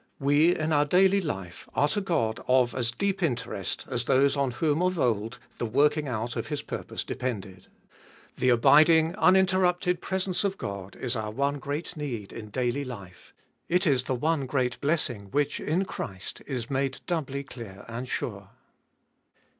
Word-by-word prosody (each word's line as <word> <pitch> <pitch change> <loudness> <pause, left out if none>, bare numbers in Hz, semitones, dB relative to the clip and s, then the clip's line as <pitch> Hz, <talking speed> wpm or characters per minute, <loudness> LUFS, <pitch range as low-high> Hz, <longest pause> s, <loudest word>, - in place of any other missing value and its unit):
We 145 +5 +4
in 155 0 0
our 145 0 +4
daily 190 +5 +4
life 95 - -6
are 145 - +4
to 205 - 0
God 125 - 0
of 125 -1 +4
as 120 -2 -1
deep 195 +9 -1
interest 120 - -2
as 120 -1 -2
those 135 +3 +4
on 140 -2 +1
whom 150 +6 0
of 185 0 +1
old 115 -1 0 0.2
the - - 0
working 145 +5 +2
out 120 -1 -3
of - - -3
His 150 -2 -3
purpose - - -5
depended. 100 -7 -5 0.7
The 130 - +1
abiding, 155 +7 +6
uninterrupted 185 -2 +3
presence 190 0 -1
of 195 -1 -1
God 100 -1 -6
is 125 -1 -2
our 110 -2 -2
one 140 +5 -1
great 145 +6 -4
need 125 -10 -5
in 105 -1 -8
daily 125 +4 -1
life. 100 -9 -10 0.4
It 180 +3 +3
is 130 -5 +2
the 130 - 0
one 150 +1 0
great 125 -2 -1
blessing 125 -10 0
which 145 +5 0
in 175 +6 0
Christ 95 - -6
is 125 -5 -3
made 135 -1 -1
doubly 140 -5 -2
clear 115 -7 -10
and 120 +2 -6
sure. - - -4
135 Hz, 165 wpm, -27 LUFS, 120-160 Hz, 0.7 s, abiding